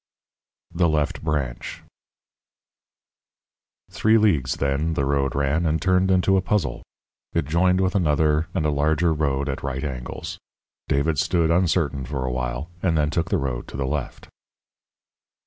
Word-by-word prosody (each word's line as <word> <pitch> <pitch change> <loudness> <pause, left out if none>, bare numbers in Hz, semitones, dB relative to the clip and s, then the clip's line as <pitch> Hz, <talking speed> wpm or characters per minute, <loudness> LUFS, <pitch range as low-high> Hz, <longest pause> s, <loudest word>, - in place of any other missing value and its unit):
THE 85 0 +2
LEFT 75 -2 -1
BRANCH 70 -6 -3 2.1
_Three 110 +1 +3
leagues, 75 - +2
then, 70 +4 -1
the 70 - 0
road 70 -1 0
ran, 70 +4 +1
and 80 +1 +1
turned 90 +3 +2
into 95 +1 +3
a - - +2
puzzle. 90 -9 -1 0.5
It - - 0
joined 90 +5 +2
with 95 -1 +1
another 75 -3 +2
and 80 -5 0
a 75 - +2
larger 80 +3 +2
road 70 -3 -1
at 65 - -3
right 65 0 -3
angles. 65 -4 -5 0.5
David 70 +1 +1
stood, 85 0 +2
uncertain, 85 -6 +1
for 65 0 -3
a 65 - -1
while, 65 +5 -3
and 85 -4 +1
then 75 -1 +1
took 85 -1 -1
the - - +2
road 65 -3 -3
to - - -8
the 70 - -1
left. 70 0 -4
75 Hz, 150 wpm, -23 LUFS, 70-85 Hz, 2.1 s, Three